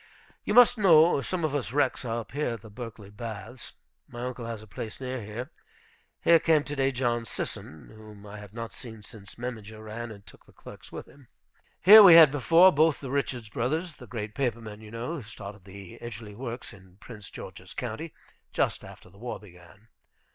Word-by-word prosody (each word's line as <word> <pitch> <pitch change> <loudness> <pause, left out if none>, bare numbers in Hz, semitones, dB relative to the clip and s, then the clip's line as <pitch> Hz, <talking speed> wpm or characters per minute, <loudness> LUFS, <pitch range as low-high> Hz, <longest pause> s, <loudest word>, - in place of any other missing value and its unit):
You 210 - -1
must 245 -1 +7
know, 165 -6 +6
some 175 +2 -2
of 150 - -2
us 140 -5 -2
wrecks 140 -2 +1
are 115 0 -2
up - - -14
here 145 -3 -1
at 110 - -12
the 110 -1 -13
Berkeley 110 -3 -9
baths. 115 +2 -8 0.3
My 120 +1 -6
uncle 125 -2 -5
has 115 -2 -6
a - - -11
place 110 +2 -7
near 130 -1 -4
here. 115 +8 -7 0.7
Here 170 -1 +6
came 160 -3 +3
to 145 -1 -5
day 135 -1 +2
John 120 -3 -1
Sisson, 80 -7 -6
whom 105 -1 -13
I 105 +1 -9
have 105 -2 -11
not 115 +1 -7
seen 110 -3 -10
since 105 -3 -13
Memminger 110 -3 -7
ran 115 +2 -6
and 100 -2 -12
took - - -17
the - - -20
clerks - - -13
with - - -7
him. 140 -3 -19 0.6
Here 215 +4 +11
we 185 -5 +10
had 160 -4 +9
before, 165 +6 +6
both 155 0 +3
the 135 -3 -7
Richards 125 -5 -2
brothers, 155 +10 -2
the 125 - -12
great 105 -2 -5
paper 120 -4 -1
men, 110 -2 -10
you 110 - -11
know, 120 +9 -4
who - - -6
started 105 -3 -10
the 100 -1 -11
Edgerly 110 -2 -8
Works 120 +2 -7
in 95 -2 -18
Prince 105 -3 -11
George's - - -10
County, 125 +7 -5 0.4
just - - -1
after - - -13
the 95 +2 -19
war 120 +1 -5
began. 95 +2 -17
120 Hz, 205 wpm, -27 LUFS, 105-140 Hz, 0.7 s, Here